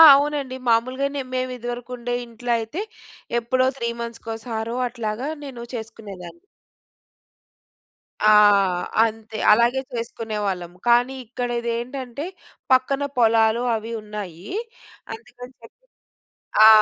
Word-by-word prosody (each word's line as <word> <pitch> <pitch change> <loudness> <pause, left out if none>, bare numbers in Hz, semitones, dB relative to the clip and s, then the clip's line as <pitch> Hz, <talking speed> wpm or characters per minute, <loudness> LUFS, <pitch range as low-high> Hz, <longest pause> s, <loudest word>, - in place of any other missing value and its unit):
అవునండి 285 -2 0
మాములుగానే 260 +5 +1
మేము 255 0 -1
ఇదివరకు 240 +1 -6
ఉండే 245 0 -2
ఇంట్లో 235 +1 -5
అయితే 225 - -4 0.6
ఎప్పుడో 255 +2 +2
3 230 -1 -4
అట్లాగా 235 +3 -3
నేను 250 -4 -7
చేసుకునేదాన్ని. 215 - -8 1.8
ఆ! - - +5 0.8
అంతే 220 -1 -3
అలాగే 240 +4 +4
చేసుకునేవాళ్ళం. 210 -6 -3 0.2
కానీ 245 +3 +4
ఇక్కడ 245 +1 -3
ఇదేంటంటే 245 +4 -4 0.5
పక్కన 270 +2 +3
పొలాలు 225 0 +4
అవి 225 +1 -5
ఉన్నాయి. 200 -4 -7 0.7
అందుకని 250 - -11
జెప్పి 230 - -15 0.9
ఆ! - - +11
235 Hz, 95 wpm, -23 LUFS, 220-255 Hz, 1.8 s, ఆ